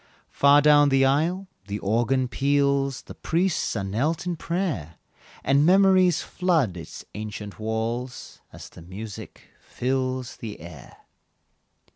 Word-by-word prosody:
Far 140 +1 +5
down 145 -1 +6
the 135 0 +4
aisle 165 +8 +1 0.2
the 100 +1 -3
organ 120 +6 0
peals, 140 0 +1
The - - -10
priests 175 -3 -1
are 100 - -2
knelt 140 - -1
in 175 -1 -2
prayer 160 - -3 0.5
And 140 +2 +3
memories 185 -1 +4
flood 165 - 0
its 85 - -9
ancient 105 -1 -7
walls, 115 +3 -4
As - - -11
the - - -14
music 100 +4 -9 0.2
fills 130 0 -3
the 110 -3 -8
air. 80 -5 -12
135 Hz, 125 wpm, -25 LUFS, 110-155 Hz, 0.5 s, down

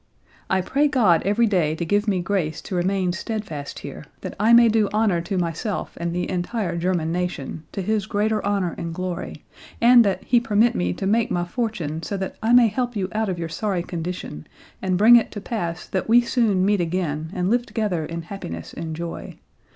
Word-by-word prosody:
"I 190 0 +2
pray 280 +10 +2
God 220 - +3
every 210 +4 +3
day 175 -8 +1
to 170 - -3
give 205 +5 +1
me 190 -3 +1
grace 175 -4 -1
to - - -8
remain 185 0 +1
steadfast 185 -8 -5
here, - - -8 0.2
that - - -6
I 215 +3 +4
may 235 0 +8
do 220 -2 +2
honor 210 -5 +2
to 190 +3 -3
myself 175 +4 -3
and 170 0 -1
the 180 +1 -2
entire 180 0 -2
German 170 -2 0
nation, 165 -3 -3
to 195 - -4
His 215 0 0
greater 215 +1 0
honor 200 -4 0
and 165 -1 -4
glory, 180 -1 -5 0.4
and 240 0 +7
that 200 -3 -1
He 240 - +3
permit 225 0 +2
me 90 0 0
to - - -5
make 225 +3 +2
my 175 0 -1
fortune 175 - -3
so 200 +4 -4
that 190 -1 -4
I 225 +1 +1
may 245 -1 +7
help 245 +2 -2
you 190 -2 -2
out 220 -1 0
of 180 - -2
your 165 -1 -4
sorry 185 +1 -2
condition, 170 - -6 0.3
and 185 -1 0
bring 230 +5 +8
it 235 - +1
to 205 - -5
pass 175 -5 -4
that 190 +2 -2
we 240 +2 +7
soon 225 -6 +1
meet 205 -2 +2
again 165 -3 -2
and 180 +2 0
live 240 0 +1
together 205 -8 -1
in 165 +2 -5
happiness 85 - -7
and 160 -1 -5
joy. 170 +1 -6
190 Hz, 205 wpm, -23 LUFS, 170-220 Hz, 0.4 s, may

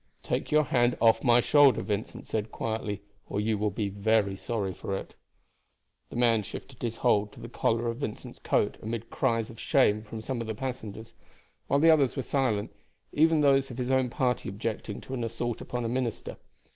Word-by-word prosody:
"Take - - -2
your 155 0 +4
hand 120 -3 +2
off 115 -1 +4
my 120 -1 +5
shoulder," 145 -3 +5
Vincent 105 +1 -4
said 110 0 -3
quietly, 105 -3 -3 0.3
"or - - -1
you 110 +1 +1
will 105 0 +1
be 100 0 -3 0.4
sorry 100 -2 -3
for 95 - -4
it." - - -8 1.0
The - - -9
man 115 -2 +3
shifted 125 +5 -9
his 115 -2 -2
hold 105 -4 +2
to - - -13
the 115 - -7
collar 115 0 0
of 115 0 -2
Vincent's 120 -6 -6
coat - - +1
amid 115 +1 -5
cries 115 -4 0
of 115 - -13
shame 115 -7 +3
from 110 +1 -8
some 120 +2 -3
of 115 - -5
the 110 - -3
passengers, 110 -3 -6 0.5
while 140 - +3
the 165 +2 +7
others 140 -5 +3
were 135 - -2
silent, 115 -7 0 0.4
even 160 +1 +4
those 135 -1 +4
of 125 - -8
his 125 0 -1
own 130 -1 +2
party 125 -3 0
objecting 105 +1 -4
to 130 - -8
an 120 -3 -2
assault 115 0 -3
upon 120 -1 -4
a - - 0
minister. 120 -1 -3
115 Hz, 195 wpm, -28 LUFS, 110-130 Hz, 1.0 s, the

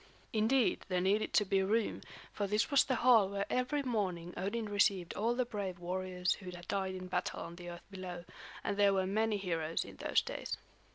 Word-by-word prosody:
Indeed, 225 +3 +3
there 180 -1 +1
needed 200 +4 +2
to 210 - +4
be 195 0 +2
room, 215 +3 +1 0.3
for 205 - -1
this 210 +6 +1
was 280 - +6
the 260 - 0
hall 225 -6 +7
where 200 0 -1
every 265 +3 +1
morning 185 -8 -1
Odin 210 +5 -2
received 200 -3 +2
all 230 +3 +1
the 255 0 +1
brave 200 -6 -4
warriors 180 +1 -1
who 185 -2 -7
had 175 -1 -9
died 190 -1 -1
in 185 0 -6
battle 180 0 -2
on 170 - -7
the 175 0 -8
earth 175 0 -9
below; 180 -2 -6 0.4
and 200 - -1
there 200 -1 +5
were 190 -1 +2
many 215 +2 +1
heroes 165 -4 -1
in - - -11
those - - +2
days. - - -4
195 Hz, 205 wpm, -34 LUFS, 180-215 Hz, 0.4 s, hall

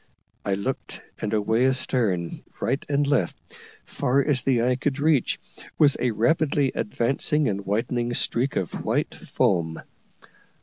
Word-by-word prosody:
I 100 - 0
looked, 130 +7 -4 0.2
and 105 - -2
away 110 +4 +2
astern, 115 -9 0 0.2
right 135 - -1
and 145 0 +2
left, 140 -12 +1 0.5
far 135 +2 +1
as 145 -4 +2
the 125 -4 +2
eye 125 +1 +2
could 135 +1 -1
reach, 150 -3 +2 0.4
was 145 -3 +5
a 125 - +1
rapidly 135 +4 +2
advancing 135 +7 0
and 100 -2 -2
widening 120 +3 -1
streak 130 +4 0
of 90 - -3
white - - 0
foam. 80 -4 0
125 Hz, 135 wpm, -25 LUFS, 105-140 Hz, 0.5 s, was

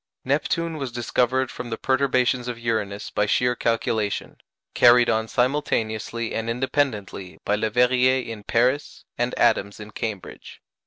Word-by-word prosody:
Neptune 160 +4 -1
was 135 -4 -4
discovered 125 +2 0
from 120 - -7
the 115 - -3
perturbations 130 -2 +1
of 120 -2 -4
Uranus 110 -3 -3
by 105 - 0
sheer 125 +3 +2
calculation, 110 -3 -1 0.4
carried 120 0 +6
on 110 0 0
simultaneously 115 -3 -1
and 115 +1 -2
independently 115 - -2
by 105 - +2
Leverrier 125 +4 +3
in 115 -2 -7
Paris, 125 +7 0
and 120 +1 -2
Adams 100 +1 +2
in 105 0 -9
Cambridge. 105 -3 -6
120 Hz, 135 wpm, -23 LUFS, 110-130 Hz, 0.4 s, carried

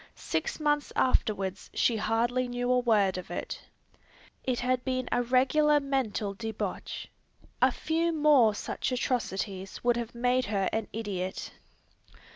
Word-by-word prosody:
Six 485 - -2
months 295 -1 +1
afterwards 195 -6 0
she 230 - +2
hardly 240 +4 +1
knew 245 0 -1
a 250 - +4
word 205 -6 +2
of 180 - -10
it. 175 - -5 0.8
It 255 -2 -1
had 250 0 +1
been 255 -1 -1
a 245 - +2
regular 270 +5 +4
mental 260 -7 -1
debauch. 220 +1 -5 0.5
A - - +6
few 330 +1 0
more 295 -9 +5
such - - -3
atrocities 195 -6 -2
would 240 -1 +3
have 235 0 -4
made 250 +1 +2
her 200 -2 0
an 220 -1 -1
idiot. 195 -4 -4
245 Hz, 135 wpm, -29 LUFS, 210-255 Hz, 0.8 s, A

